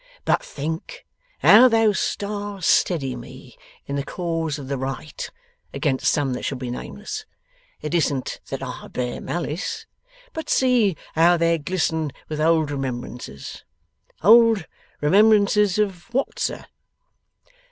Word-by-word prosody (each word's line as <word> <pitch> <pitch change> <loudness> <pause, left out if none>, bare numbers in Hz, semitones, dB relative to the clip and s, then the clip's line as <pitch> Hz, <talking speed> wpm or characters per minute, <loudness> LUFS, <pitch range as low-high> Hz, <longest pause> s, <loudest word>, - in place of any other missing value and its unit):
'But - - +2
think 160 - -6 0.4
how 235 +5 +9
those 225 -4 +3
stars 205 -2 -3
steady 135 -8 +2
me 120 -1 -11 0.3
in 140 - -3
the 140 - -1
cause 165 -2 -2
of 140 -3 -8
the 140 -1 -3
right 135 +3 -5 0.5
against 130 -1 0
some 140 -4 0
that 125 - -5
shall 135 - -2
be 125 -1 -5
nameless. 215 - -6 0.6
It 150 - -3
isn't 145 -6 0
that 135 0 -4
I 125 -2 -7
bear 125 -1 -4
malice. 175 - -3 0.5
But 320 - -6
see 240 -9 +3 0.2
how 170 +2 +5
they 165 0 +2
glisten 160 -2 -1 0.2
with 155 -1 -3
old 160 -2 +3
remembrances! 125 - -6 0.6
Old 225 -2 +6 0.4
remembrances 205 +3 +4
of 200 -1 -2
what, 265 +3 -1
sir? - - -2
165 Hz, 130 wpm, -23 LUFS, 140-205 Hz, 0.6 s, how